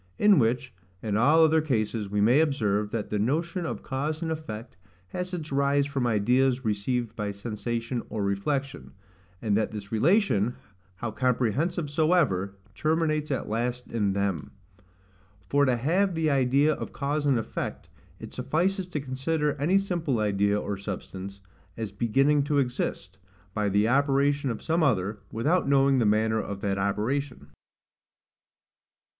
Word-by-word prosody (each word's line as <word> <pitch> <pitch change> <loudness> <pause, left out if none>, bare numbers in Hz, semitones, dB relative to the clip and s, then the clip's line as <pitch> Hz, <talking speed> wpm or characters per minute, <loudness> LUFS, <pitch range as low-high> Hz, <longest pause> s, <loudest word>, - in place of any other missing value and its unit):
In 210 -5 +5
which, 125 +2 0 0.3
and 105 -2 -1
all 150 +9 +5
other 160 0 +4
cases, 110 -7 -1
we 105 +1 0
may 120 +7 +5
observe, 105 -9 +1
that 110 -1 -4
the 105 - 0
notion 165 - -1
of - - -5
cause 150 +5 -3
and 160 - -2
effect 120 -8 -6 0.3
has 180 - -4
its 160 -5 -5
rise 140 +1 +2
from 140 -3 -1
ideas 125 +4 +2
received 110 +2 -1
by 105 -2 -3
sensation 115 +3 -3
or 105 -1 -2
reflection; 135 +8 -2 0.5
and 105 -3 +1
that 110 +1 +1
this 105 -2 -8
relation, 125 - +2 0.4
how 115 +4 -4
comprehensive 130 - 0
soever, 145 - +1 0.2
terminates 155 - 0
at 135 -4 -2
last 120 +3 -3
in 105 -4 0
them. 100 -6 -1 1.0
For 145 +6 +3
to 125 -2 +2
have 175 +9 +1
the 160 -2 +1
idea 140 +3 +3
of - - -6
cause 145 +1 -1
and 135 -3 +3
effect, 110 - -4 0.3
it - - -9
suffices 185 +3 0
to 165 -4 -3
consider 145 +3 -1
any 175 +7 +3
simple 175 -9 -1
idea 100 -1 +1
or 100 -1 -3
substance, 100 0 -7 0.4
as 110 -3 -4
beginning 135 +8 +2
to 145 0 +1
exist, 125 -8 -2 0.3
by 105 -1 0
the 105 +2 +2
operation 140 +1 +2
of 115 - -4
some 165 +1 +1
other, 105 - +1
without 145 +7 +1
knowing 135 -1 +4
the 115 - +3
manner 110 +1 +2
of 100 -1 -6
that 100 -1 -1
operation. 105 - -2
125 Hz, 150 wpm, -27 LUFS, 105-150 Hz, 1.0 s, In